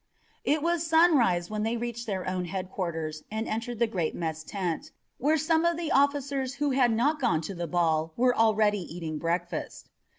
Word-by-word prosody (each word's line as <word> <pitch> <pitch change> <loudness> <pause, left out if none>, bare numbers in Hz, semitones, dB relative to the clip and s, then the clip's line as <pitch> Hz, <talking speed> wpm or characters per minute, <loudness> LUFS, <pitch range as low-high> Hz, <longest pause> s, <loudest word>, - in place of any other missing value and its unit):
It 300 0 +1
was 340 -1 +1
sunrise 270 - +4
when 215 0 -2
they 225 +2 0
reached 235 0 -4
their 190 -3 -3
own 185 -1 -1
headquarters 170 -4 -4
and 220 +1 -3
entered 230 +2 -3
the 235 - +3
great 180 -8 -2
mess 160 -2 -3
tent, 180 -2 -3 0.3
where 305 +4 +3
some 320 +2 +2
of 340 -1 +2
the 335 -2 -3
officers 275 -1 +1
who 290 0 0
had 255 -2 +3
not 280 +7 +1
gone 235 - +2
to 180 +5 -5
the 170 -1 -4
ball 160 -2 +1
were 250 +1 +3
already 215 -2 +3
eating 165 -3 -5
breakfast. 170 0 -3
220 Hz, 185 wpm, -28 LUFS, 175-275 Hz, 0.3 s, sunrise